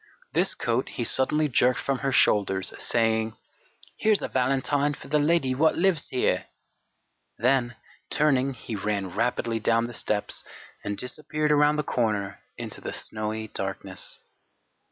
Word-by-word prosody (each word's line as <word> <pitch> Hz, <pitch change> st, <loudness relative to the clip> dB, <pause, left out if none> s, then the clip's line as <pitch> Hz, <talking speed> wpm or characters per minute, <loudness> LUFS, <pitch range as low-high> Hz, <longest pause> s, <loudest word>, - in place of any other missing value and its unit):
This -, -, +2 dB
coat 120 Hz, +2 st, -1 dB
he 120 Hz, -, -4 dB
suddenly 150 Hz, +6 st, +3 dB
jerked 125 Hz, -1 st, +3 dB
from 135 Hz, -2 st, -1 dB
her 135 Hz, 0 st, -1 dB
shoulders, 95 Hz, -6 st, +3 dB
saying: 110 Hz, -2 st, +1 dB, 0.6 s
"Here's 215 Hz, -2 st, +3 dB
a -, -, -1 dB
valentine 135 Hz, +3 st, +1 dB
for -, -, -12 dB
the 150 Hz, +1 st, +3 dB
lady 145 Hz, -3 st, +2 dB
wot 155 Hz, +5 st, +3 dB
lives 175 Hz, -4 st, +1 dB
here!" 130 Hz, -, 0 dB, 0.9 s
Then, 120 Hz, -1 st, +2 dB, 0.3 s
turning, 135 Hz, -3 st, +2 dB
he 115 Hz, -1 st, -6 dB
ran 100 Hz, -1 st, -2 dB
rapidly 115 Hz, +2 st, -1 dB
down 115 Hz, +1 st, +2 dB
the 120 Hz, -, -7 dB
steps 105 Hz, -2 st, -1 dB, 0.4 s
and 100 Hz, 0 st, -3 dB
disappeared 150 Hz, +4 st, -2 dB
around 150 Hz, 0 st, +4 dB
the 150 Hz, -, 0 dB
corner 105 Hz, -7 st, -1 dB, 0.2 s
into -, -, -7 dB
the -, -, -5 dB
snowy 110 Hz, 0 st, -4 dB
darkness. 95 Hz, -1 st, -4 dB
125 Hz, 140 wpm, -26 LUFS, 110-145 Hz, 0.9 s, around